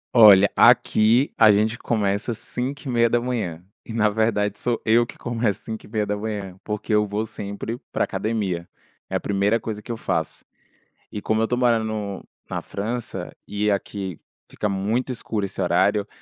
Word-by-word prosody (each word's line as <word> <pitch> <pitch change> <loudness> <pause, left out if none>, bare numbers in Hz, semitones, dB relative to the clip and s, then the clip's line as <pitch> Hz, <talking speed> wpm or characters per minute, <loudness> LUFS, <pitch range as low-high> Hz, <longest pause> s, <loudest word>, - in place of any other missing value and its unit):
Olha, 100 -3 +8
aqui 115 +6 +5
a 110 -1 +6
gente 110 +2 +2
começa 105 0 0
5h30, 120 - -1 0.2
e - - -10
na 105 -2 +3
verdade 105 -1 0
sou 120 -2 0
eu 115 +2 +4
que - - -12
começo 115 -4 -1
5h30, 105 -3 -3
porque 105 0 -3
eu 105 0 +4
vou 105 +2 -2
sempre 110 +2 -6
pra - - +1
academia, 100 -6 -2 0.4
é - - -3
a - - +2
primeira 100 +3 +1
coisa 110 -2 -5
que 120 - -8
eu 115 - -3
faço, - - -3 0.7
e 105 - -5
como 110 +1 +1
eu 110 - +2
tô 125 - 0
morando 120 -3 +3
no 105 -3 -4 0.3
na - - -3
França 110 -3 -5
e 105 +1 -1
aqui 100 -3 -3 0.3
fica 105 - -2
muito 105 +7 -1
escuro 110 -4 -3
esse 100 - -5
horário, 100 +3 +2
110 Hz, 155 wpm, -23 LUFS, 100-115 Hz, 0.7 s, Olha